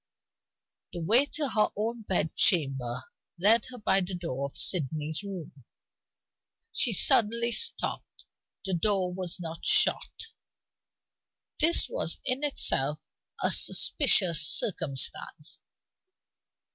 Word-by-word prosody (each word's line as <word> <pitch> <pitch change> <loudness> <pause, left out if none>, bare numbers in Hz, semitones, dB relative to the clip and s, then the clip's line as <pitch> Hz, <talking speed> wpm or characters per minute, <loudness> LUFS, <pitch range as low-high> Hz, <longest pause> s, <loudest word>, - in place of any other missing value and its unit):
The 175 - -6
way 235 - +3
to 290 -1 -4
her 215 -3 +1
own 225 +3 -4
bed 180 -6 -2
chamber 135 -7 0 0.3
led 215 +6 +3
her 255 -1 -11
by 195 -3 +1
the 180 0 -5
door 140 -6 -5
of 140 - -14
Sydney's 155 -1 0
room. 180 -9 -10 1.1
She - - +1
suddenly 235 +2 +2
stopped; 460 - -3 0.4
the 190 - -2
door 185 0 0
was 180 -2 -3
not 165 -1 -8
shut. 425 +1 +2 1.3
This 330 +2 +3
was - - -1
in 265 +2 -2
itself 150 - +1 0.5
a - - +4
suspicious 185 - +4
circumstance. 150 -2 0
185 Hz, 105 wpm, -27 LUFS, 160-235 Hz, 1.3 s, a